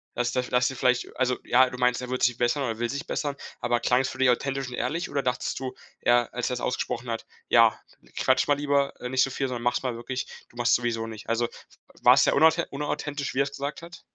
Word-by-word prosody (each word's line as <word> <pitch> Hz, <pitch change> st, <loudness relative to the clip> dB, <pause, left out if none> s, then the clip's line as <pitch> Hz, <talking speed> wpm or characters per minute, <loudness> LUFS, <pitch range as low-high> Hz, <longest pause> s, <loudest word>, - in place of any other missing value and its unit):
Das 120 Hz, 0 st, 0 dB
da 125 Hz, -, +1 dB
das 125 Hz, 0 st, +1 dB
ihr -, -, -8 dB
vielleicht 125 Hz, 0 st, 0 dB
also 125 Hz, -1 st, +1 dB
ja, 130 Hz, +1 st, +4 dB
du 125 Hz, -, -8 dB
meinst, 125 Hz, 0 st, +2 dB
er 125 Hz, -, -6 dB
wird 130 Hz, 0 st, -2 dB
sich 120 Hz, -1 st, +3 dB
bessern 120 Hz, +4 st, +1 dB
oder 120 Hz, -, -1 dB
er 110 Hz, -, -7 dB
will 120 Hz, -, -1 dB
sich 140 Hz, +2 st, -4 dB
bessern. 145 Hz, -2 st, -2 dB, 0.2 s
Aber 120 Hz, -1 st, +1 dB
klang 125 Hz, +2 st, +3 dB
es 130 Hz, -, -2 dB
für 130 Hz, -, -8 dB
dich 130 Hz, -1 st, +4 dB
authentisch 135 Hz, +1 st, -1 dB
und 125 Hz, -, -8 dB
ehrlich? 150 Hz, +9 st, -2 dB
Oder 140 Hz, -, 0 dB
dachtest 125 Hz, -1 st, -2 dB
du 130 Hz, -1 st, -5 dB, 0.2 s
eher 120 Hz, -1 st, +2 dB
als 125 Hz, 0 st, -1 dB
er 125 Hz, -, -1 dB
es -, -, -5 dB
ausgesprochen 120 Hz, 0 st, -2 dB
hat: 115 Hz, -, -4 dB, 0.2 s
„Ja, -, -, +5 dB, 0.4 s
quatsch 130 Hz, 0 st, +2 dB
mal 145 Hz, -, +4 dB
lieber, 140 Hz, -1 st, 0 dB
äh, 125 Hz, -, -5 dB
nicht 130 Hz, 0 st, +2 dB
so 135 Hz, -, +3 dB
viel, 135 Hz, +1 st, -2 dB
sondern 125 Hz, -2 st, -4 dB
mach's 120 Hz, +2 st, +1 dB
mal 125 Hz, -2 st, -2 dB
wirklich! 125 Hz, +2 st, -4 dB, 0.2 s
Du -, -, -23 dB
machst's 120 Hz, 0 st, +3 dB
sowieso 115 Hz, -2 st, -1 dB
nicht.“ 110 Hz, 0 st, -9 dB
Also 115 Hz, +1 st, +1 dB, 0.5 s
war's -, -, +7 dB
sehr -, -, +3 dB
unauthen 160 Hz, +3 st, +4 dB
unauthentisch, 145 Hz, -1 st, -3 dB
wie 140 Hz, -, +3 dB
er -, -, +5 dB
es 140 Hz, -, -5 dB
gesagt 140 Hz, +4 st, -5 dB
hat? 170 Hz, 0 st, -11 dB
125 Hz, 260 wpm, -26 LUFS, 120-140 Hz, 0.5 s, war's